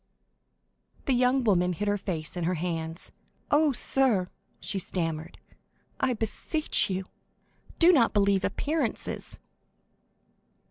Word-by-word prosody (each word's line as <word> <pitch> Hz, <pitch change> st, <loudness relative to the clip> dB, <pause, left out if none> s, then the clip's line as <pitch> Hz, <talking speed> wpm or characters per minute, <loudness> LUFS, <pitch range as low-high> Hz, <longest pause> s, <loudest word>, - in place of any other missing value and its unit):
50165m -, -, -35 dB
The 270 Hz, -, +2 dB
young 250 Hz, +1 st, +3 dB
woman 180 Hz, -5 st, +2 dB
hid 205 Hz, +5 st, -3 dB
her 205 Hz, -, +2 dB
face 165 Hz, -5 st, -4 dB
in 175 Hz, -2 st, -2 dB
her 180 Hz, +2 st, 0 dB
hands. 165 Hz, 0 st, -3 dB, 0.4 s
"Oh, 300 Hz, 0 st, +4 dB
sir," 240 Hz, -7 st, +2 dB, 0.3 s
she 195 Hz, -, -2 dB
stammered, 165 Hz, -3 st, -3 dB, 0.6 s
"I 260 Hz, -1 st, +1 dB
beseech 230 Hz, -, +1 dB
you, 190 Hz, 0 st, -2 dB, 0.7 s
do 345 Hz, +1 st, +7 dB
not 240 Hz, -8 st, +4 dB
believe 200 Hz, -2 st, +2 dB
appearances." 295 Hz, -5 st, -2 dB
200 Hz, 120 wpm, -27 LUFS, 180-260 Hz, 0.7 s, do